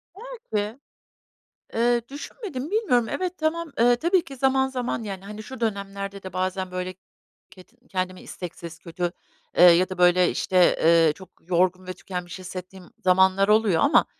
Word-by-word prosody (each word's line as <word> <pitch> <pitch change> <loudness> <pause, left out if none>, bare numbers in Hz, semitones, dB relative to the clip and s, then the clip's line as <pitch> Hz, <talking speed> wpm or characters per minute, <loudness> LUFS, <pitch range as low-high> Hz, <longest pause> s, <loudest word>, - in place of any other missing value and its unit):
Belki. 280 - -5 0.9
Eee, 235 +1 +2
düşünmedim, 295 - -7
bilmiyorum. 250 - +2
Evet, 365 -1 -3
tamam, 320 0 -1
eee, 240 +1 +5
tabii 345 +6 +2
ki 275 -5 -10
zaman 265 0 +2
zaman, 250 -3 -3
yani, 195 -2 -6
hani, 210 +1 -8
şu 260 +2 -9
dönemlerde 200 -2 -4
de 190 - -8
bazen, 185 0 -2
böyle, 185 0 -4 0.6
kedi 185 -5 -19
kendimi 185 -1 -3
isteksiz, 170 -2 -9
kötü, 175 0 -3 0.5
eee, - - +7
ya 180 +1 +7
da, 185 - -6
böyle, 180 0 +5
işte, 180 -2 +3
eee, 165 -2 +5
çok 190 +2 -14
yorgun 185 +1 0
ve 185 - -4
tükenmiş 180 -1 -7
hissettiğim 185 0 -9 0.2
zamanlar 190 +1 +4
oluyor 210 -5 +3
ama, 285 - +5
195 Hz, 150 wpm, -24 LUFS, 185-250 Hz, 0.9 s, eee